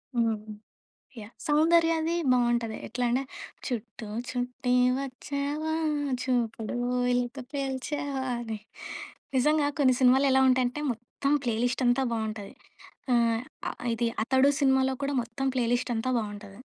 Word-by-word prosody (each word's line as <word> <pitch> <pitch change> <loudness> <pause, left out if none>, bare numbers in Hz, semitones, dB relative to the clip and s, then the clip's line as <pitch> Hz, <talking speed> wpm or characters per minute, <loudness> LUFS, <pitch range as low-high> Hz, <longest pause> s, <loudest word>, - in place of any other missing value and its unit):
హ్మ్. 225 -2 +2 0.8
యాహ్! 210 0 -9 0.2
సౌందర్యది 330 +2 +3 0.2
బావుంటది. 240 -2 +1
ఎట్లా 250 - -3
అంటే 255 +3 +2 0.5
చుట్టూ 225 -2 -5 0.2
చుట్టి 250 0 -1 0.2
వచ్చావా 280 +3 -3 0.5
చూపుడు 235 -3 -1 0.3
వేలుతో 245 +2 0
పేల్చావా 275 0 -2 0.2
అని 225 -3 -5 0.8
నిజంగా 300 +2 +3
కొన్ని 260 -3 +5
సినిమాలు 260 +2 +5
ఎలా 265 - +5
ఉంటాయంటే 255 +3 +1
మొత్తం 240 +4 -3
ప్లే 230 - +1
లిస్టంతా 250 +1 +2
బావుంటది. 215 -2 -4 0.6
ఆహ్, 230 -1 +3 0.3
అ - - -3 0.2
ఇది 235 +1 0
'అతడు' 265 +4 +4
సినిమాలో 265 -1 +3
కూడా 280 +1 -1
మొత్తం 235 +3 -5
ప్లే 245 -2 +2
లిస్టంతా 245 0 0
బావుంటది. 205 -2 -6
250 Hz, 115 wpm, -28 LUFS, 235-275 Hz, 0.8 s, కొన్ని